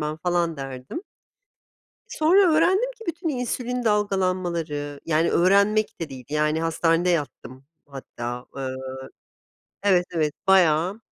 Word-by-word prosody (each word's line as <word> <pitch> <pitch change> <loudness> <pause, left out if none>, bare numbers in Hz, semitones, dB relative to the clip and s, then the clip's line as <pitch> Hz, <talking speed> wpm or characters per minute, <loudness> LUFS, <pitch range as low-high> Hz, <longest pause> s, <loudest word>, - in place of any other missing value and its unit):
ben." 150 +1 -3
falan 170 -1 0
derdim. 135 - -7 1.1
Sonra 350 +3 +4
öğrendim 380 +10 +3
ki - - -10
bütün 335 0 -2
insülin 250 -2 -3
dalgalanmaları 185 -8 -1
Yani 165 +1 +2
öğrenmek 200 +4 +3
de 160 - -4
değil, 130 -2 -10
yani, 150 +1 0
hastanede 165 +1 +1
yattım 140 -5 -3 0.2
hatta. 125 -3 -7
Iıı 130 -1 -5 0.9
Evet, 185 -3 +3
evet 155 -3 0
bayağı, 185 +2 +3
170 Hz, 115 wpm, -24 LUFS, 145-210 Hz, 1.1 s, Sonra